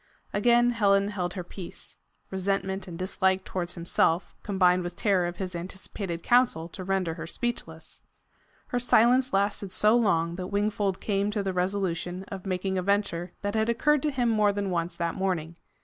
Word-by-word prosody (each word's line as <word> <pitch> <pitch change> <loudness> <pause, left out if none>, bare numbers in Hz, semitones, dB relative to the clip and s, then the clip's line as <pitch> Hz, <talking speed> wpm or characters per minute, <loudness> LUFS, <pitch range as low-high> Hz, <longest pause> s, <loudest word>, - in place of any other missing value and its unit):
Again 240 +3 +4
Helen 200 -3 +3
held 180 -3 -3
her 180 - -4
peace. 175 0 -9 0.3
Resentment 190 0 -1
and 170 -2 -7
dislike 190 +1 +1
towards 175 -1 -3
himself 170 0 +1
combined 185 -2 +3
with 175 0 -5
terror 190 -3 +2
of 175 - -6
his 185 -2 -4
anticipated 180 0 -5
counsel 240 -10 +3
to 185 - -7
render 190 -3 0
her 165 0 -7
speechless. 165 -7 -5 0.7
Her 245 - 0
silence 250 +2 +4
lasted 200 0 0
so 210 +4 +4
long 170 -7 +2
that 180 -1 -4
Wingfold 205 -1 -1
came 200 -1 0
to 210 -1 -1
the 190 -1 -2
resolution 180 -1 -1
of 195 -1 -7
making 190 0 -1
a - - 0
venture 185 -3 0
that 205 0 -1
had 220 +1 +1
occurred 285 +5 +3
to 300 - +1
him 255 -4 0
more 215 -2 +3
than 200 -1 -2
once 170 0 -1
that 170 -1 -1
morning. 175 -4 -2
190 Hz, 175 wpm, -27 LUFS, 180-205 Hz, 0.7 s, Again